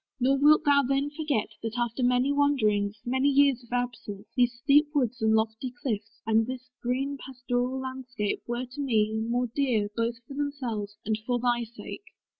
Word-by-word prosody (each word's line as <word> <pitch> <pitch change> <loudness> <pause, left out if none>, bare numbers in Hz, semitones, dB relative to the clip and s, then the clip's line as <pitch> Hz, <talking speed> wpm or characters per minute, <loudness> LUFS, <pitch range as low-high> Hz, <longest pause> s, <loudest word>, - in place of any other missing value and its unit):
Nor 270 +2 +3
wilt 300 +1 +6
thou 285 -1 +5
then 275 +2 0
forget, 290 -8 -1
That 225 +1 -4
after 240 +1 -1
many 250 +2 +3
wanderings, 215 -8 +2
many 260 +3 +2
years 275 -2 +4
Of 235 - -19
absence, 230 -4 -3
these 245 -1 +4
steep 290 +5 +4
woods 250 -3 0
and 220 0 +4
lofty 220 +3 0
cliffs, 225 -5 -4
And 225 +1 +3
this 255 -1 -7
green 270 +3 -1
pastoral 250 0 -2
landscape, 260 -5 -3
were 240 +1 -2
to 255 +4 -7
me 220 -5 +2
More 235 +3 0
dear, 240 -7 +1
both 230 0 0
for - - -8
themselves, 250 -8 -3
and 215 0 0
for 245 -1 +2
thy 240 -1 +1
sake. 235 - -9
245 Hz, 175 wpm, -28 LUFS, 225-275 Hz, -, wilt